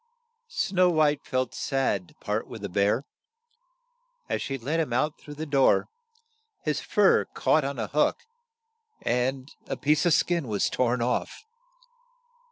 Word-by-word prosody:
" 470 0 -51
Snow 185 - +2
White 150 -3 +2
felt 130 -2 -1
sad 130 -9 -1
to - - -21
part - - -3
with - - -9
the - - -3
bear. 100 +8 +1 1.2
As - - -2
she 135 - -3
let 145 +7 -2
him 155 -6 -1
out 150 +6 0
through 145 - -10
the 155 +2 -4
door, 140 -3 +3 0.7
his 150 -1 -1
fur 205 -2 +3
caught 155 - +3
on 140 0 -3
a 110 - -1
hook, 150 +8 +1 0.9
and 130 +2 -1 0.2
a - - -3
piece 150 +1 +2
of 170 - +4
skin 170 -4 +1
was 105 -3 0
torn 125 -1 +1
off. 125 - -2
140 Hz, 155 wpm, -27 LUFS, 125-155 Hz, 1.2 s, of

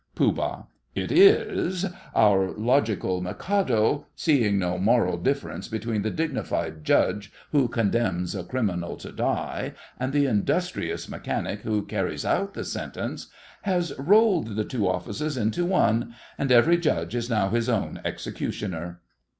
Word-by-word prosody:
POOH. - - 0 0.3
It - - -2
is. 330 - +4 0.3
Our 100 -4 +4
logical 110 -6 +1
Mikado, 135 - 0
seeing 120 - +2
no 90 -1 -1
moral 115 +5 +3
difference 140 +1 -2
between 110 -1 -2
the 110 - -1
dignified 85 - -2
judge 100 +5 +2 0.2
who 140 -4 +3
condemns 100 -6 0
a 95 -3 -4
criminal 90 -7 -2
to - - -9
die, - - -2 0.3
and 130 +1 -1
the 145 0 +3
industrious 105 -7 -1
mechanic 100 - -3
who 105 -2 -1
carries 95 -4 -2
out 200 0 0
the - - -4
sentence, - - -5 0.3
has 180 -5 0
rolled 180 - +3
the 110 0 -1
two 110 -6 -1
offices 105 - -2
into 115 +10 0
one, 120 - +1 0.2
and 135 -2 -1
every 140 +8 +6
judge 85 - 0
is 120 0 -2
now 105 -5 +1
his 115 +2 0
own 115 -5 -1
executioner. 85 -3 -4
115 Hz, 135 wpm, -25 LUFS, 100-145 Hz, 0.3 s, every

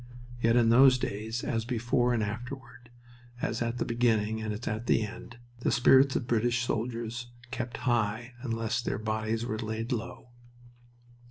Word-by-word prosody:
Yet 115 0 +3
in 120 -2 +5
those 130 +2 +7
days, 110 +1 -3
as 115 -2 -1
before 120 +1 +1
and 115 -3 +1
afterward, 120 +2 -7 0.5
as 115 -1 -2
at 115 +1 -1
the - - -1
beginning 110 -2 +1
and 110 -1 -3
as 105 +3 -5
at 110 +2 -3
the - - +3
end, 115 +2 -10 0.2
the - - 0
spirits 130 +2 +5
of - - 0
British 120 +1 +1
soldiers 120 0 -3 0.2
kept 120 -2 -4
high 115 0 0
unless 115 -1 -1
their - - -2
bodies 110 +1 -2
were 110 -2 -3
laid 110 +1 -3
low. 115 0 -4
115 Hz, 160 wpm, -29 LUFS, 110-120 Hz, 0.5 s, those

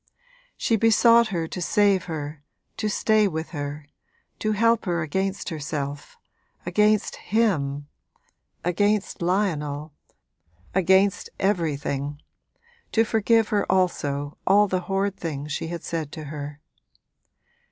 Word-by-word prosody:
She 225 - +1
besought 230 +1 +5
her 170 -6 -2
to 180 - -5
save 200 -1 +3
her, 150 -3 -5 0.4
to 215 - -1
stay 215 0 +3
with 160 -3 -4
her, 145 -1 -5 0.5
to 215 0 0
help 230 +2 +2
her 170 -2 0
against 190 +5 -2
herself, 145 -2 -5 0.5
against 210 +4 +2
him, 145 -11 0 0.8
against 205 +4 0
Lionel, 155 -5 -1 0.8
against 190 +1 +3
everything 145 -6 -1 0.7
to 225 - +4
forgive 225 0 +2
her 210 -4 +1
also 145 -6 0
all 205 +1 +5
the 185 -1 0
horrid 195 0 0
things 150 -3 -5
she 160 - -3
had 170 0 -5
said 160 -3 -3
to 155 - -6
her. 145 0 -7
180 Hz, 115 wpm, -24 LUFS, 150-205 Hz, 0.8 s, besought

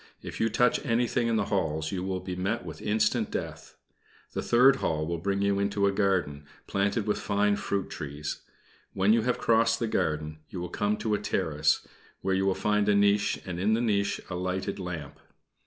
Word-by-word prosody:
If - - -7
you 115 - +2
touch 125 +3 +2
anything 120 -1 +1
in 115 - +1
the 110 -2 +1
halls 80 -4 0
you 90 -2 -3
will 95 -1 -3
meet 95 +3 -2
with 80 -2 -8
instant 105 +1 +1
death. - - -6 0.6
The - - -2
third 130 +3 +5
hall 75 -8 -1
will 85 +1 -3
bring 100 +3 -1
you 100 0 +2
into 100 0 +1
a 100 - +3
garden, 90 -8 0 0.2
planted 100 +2 0
with 105 - 0
fine 105 0 +1
fruit 100 -1 -2
trees. 75 +1 -5 0.5
When 95 +3 +3
you 115 - +3
have 125 +2 0
crossed 115 0 +3
the 115 - 0
garden, 75 -5 -1
you 90 - -6
will 90 0 -4
come 105 +3 0
to 110 -2 -1
a 105 - +1
terrace, 80 -7 0 0.3
where 95 - 0
you 95 +1 +1
will 95 - +2
find 105 0 +1
a 105 - +4
niche, 100 0 +3
and 90 -2 -5
in 105 +4 +2
the - - 0
niche 100 -4 +1
a - - -6
lighted 95 +2 -2
lamp. 85 -6 -6
100 Hz, 200 wpm, -28 LUFS, 90-105 Hz, 0.6 s, third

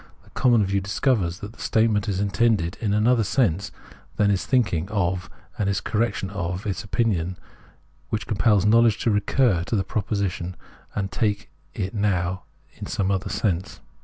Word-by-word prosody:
The - - -22
common 120 -5 +3
view 100 +1 0
discovers 100 -3 0
that 105 +2 -7
the - - -14
statement 110 -3 +2
is 95 -2 -1
intended 100 -3 +1
in 105 -3 0
another 110 +3 +3
sense 100 - +1 0.4
than 100 -1 +3
it - - +4
is 95 - -2
thinking 95 -9 +1
of, 95 -3 -1 0.3
and 100 -2 +1
this 100 - +1
correction 105 -3 -1
of 90 -1 -3
its 100 -3 -2
opinion 95 -5 0 0.7
compels 105 -2 +2
knowledge 115 0 +5
to 115 - +2
recur 105 -2 +2
to 115 - -1
the 100 - +1
proposition 95 -3 -2 0.4
and 95 -2 -2
take 100 +3 -1 0.2
it 95 - -3
now 95 -4 0 0.3
in - - -6
some 100 -1 0
other 95 +1 -1
sense. 95 -3 -2
100 Hz, 160 wpm, -24 LUFS, 95-110 Hz, 0.7 s, knowledge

